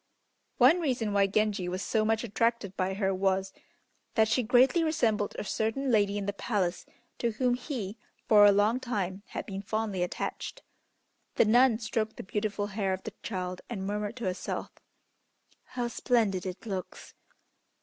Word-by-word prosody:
One 270 +8 +6
reason 245 -9 -1
why 200 -1 +4
Genji 200 -2 0
was 185 +2 -3
so 220 - +1
much 220 +1 +1
attracted 230 -3 0
by 190 +1 -1
her 195 -1 0
was, 190 0 0 0.6
that 220 -1 +4
she 230 +3 +2
greatly 255 +8 +4
resembled 230 -10 +1
a - - -3
certain 225 +6 -1
lady 205 -2 +3
in 200 - -3
the 205 - -2
Palace, 185 -5 -2 0.3
to 235 -2 0
whom 245 +2 +1
he, 245 -5 -4 0.3
for 210 -2 +7
a 205 - +8
long 210 +5 +3
time, 200 -7 -3
had - - -5
been 195 -1 -5
fondly 210 -2 -2
attached. 180 - -4 0.7
The - - +5
nun 240 +1 +5
stroked 220 -1 -2
the - - -6
beautiful 205 +1 -2
hair 195 -2 -1
of 185 - -5
the 220 - -6
child 185 -3 -4
and 195 -5 -4
murmured 210 +2 -3
to 240 - -7
herself, 185 -1 -3 0.9
"How 245 -1 -3
splendid 220 -6 +1
it 185 +5 -7
looks! 190 -4 -6
210 Hz, 165 wpm, -29 LUFS, 195-235 Hz, 0.9 s, a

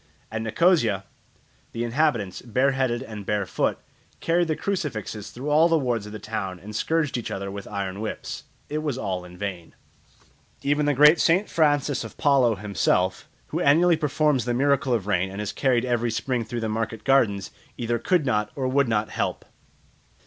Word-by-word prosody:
At 110 0 -3
Nicosia 115 - +2 0.7
the 115 - -2
inhabitants, 120 -6 0
bare 130 +4 +1
headed 130 -3 0
and 105 -2 -8
bare 105 0 -1
foot, - - 0 0.4
carried 170 +1 +1
the 155 - 0
crucifixes 135 - -3
through 135 +5 -5
all 160 +3 +5
the 165 - +4
wards 120 -7 -1
of - - -9
the 110 - -6
town 95 -4 -4
and 105 +4 -9
scourged 150 +1 0
each 115 - -5
other 100 0 -4
with 100 0 -7
iron 100 -1 -4
whips. 110 - -5 0.2
It 150 - -2
was 150 -5 -2
all 95 -6 -3
in 90 0 -12
vain. 90 -4 -6 0.9
Even 145 +1 +1
the 145 - +2
great 150 +4 +7
St. 185 +5 +3
Francis 145 -4 +1
of 115 - -10
Paolo 135 -6 +3
himself, 95 -2 0 0.2
who - - -2
annually 165 +5 +5
performs 150 -3 +1
the 120 -1 0
miracle 140 0 +2
of 115 -5 +1
rain 95 -2 +1
and 95 +2 -7
is 105 - -3
carried 130 -3 +1
every 120 -1 0
spring 120 +1 -1
through 120 +2 -4
the 110 - -1
market 110 0 -3
gardens, 110 -8 +2 0.3
either 120 0 -1
could 175 +1 +1
not 105 -5 +1
or 130 -2 -1
would 140 +1 +2
not 110 -2 0
help. - - -2
120 Hz, 185 wpm, -25 LUFS, 105-145 Hz, 0.9 s, great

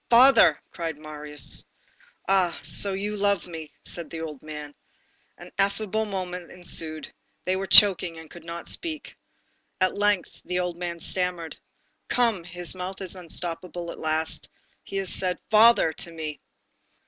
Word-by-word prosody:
"Father!" 255 +3 +7
cried 165 -3 -4
Marius. 150 -1 -4 0.6
"Ah, 185 -3 +2
so 200 -1 +1
you 205 +2 -2
love 200 -2 +1
me!" 160 -3 -8
said 170 -3 -6
the 165 - -6
old 150 -4 -6
man. 150 -1 -8 0.6
An - - -12
ineffable 210 +2 +1
moment 180 -3 -5
ensued. 165 -3 -4 0.3
They 185 - +1
were 190 +1 -3
choking 185 -5 +8
and 160 0 -10
could 170 +2 -13
not 170 +1 -7
speak. 315 -3 -4 0.6
At 185 -1 +2
length 205 -2 0
the 180 0 -2
old 180 -1 -2
man 170 -1 -5
stammered: 180 -2 -2 0.5
"Come! 230 -7 +2
his 175 0 -2
mouth 185 +1 -6
is 190 -1 -3
unstopped 175 -1 -3
at 180 - -12 0.2
last. 160 0 -2 0.3
He 195 - -5
has 195 -2 -1
said: 180 -2 +1
'Father' 220 -6 +6
to 170 - -6
me." 155 -2 -6
180 Hz, 150 wpm, -26 LUFS, 165-195 Hz, 0.6 s, choking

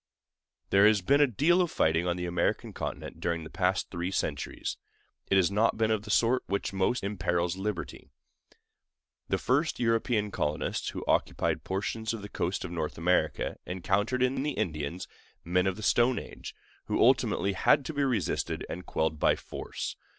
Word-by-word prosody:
There 100 +2 +7
has 105 -3 +3
been 140 +9 +4
a 145 - +6
deal 155 - +3
of 175 - +1
fighting 80 - +1
on 90 0 0
the 90 - -3
American 85 -1 -1
continent - - -5
during 85 -1 -1
the 80 - -10
past 90 0 0
three 85 0 -2
centuries; 75 -7 -3 0.5
but - - +3
it - - +6
has 95 -1 +3
not 110 +3 +2
been 110 0 +2
of 110 -2 +1
the 105 - -11
sort 120 +4 +3
which 100 0 -2
most 95 +5 0
imperils 90 -3 0
liberty. 95 -2 -5 1.2
The - - +2
first 145 +6 +1
European 115 -2 +1
colonists 75 -4 -2
who - - -6
occupied - - +1
portions 110 +4 -2
of 105 - -8
the 105 - -7
coast 90 +1 -2
of 90 - -6
North 80 -3 -3
America 90 +2 +1
encountered 100 +8 0
in 130 +1 +1
the 150 +1 -1
Indians 80 - -3 0.4
men 90 +2 +2
of 95 - 0
the 110 - -8
Stone 120 +5 +3
Age, - - -8 0.3
who - - -1
ultimately 100 0 +3
had 135 +8 +3
to 160 - -4
be 145 -1 0
resisted 120 - -1
and 90 +2 -7
quelled 80 -1 -1
by - - +4
force. - - -6
100 Hz, 180 wpm, -29 LUFS, 90-115 Hz, 1.2 s, There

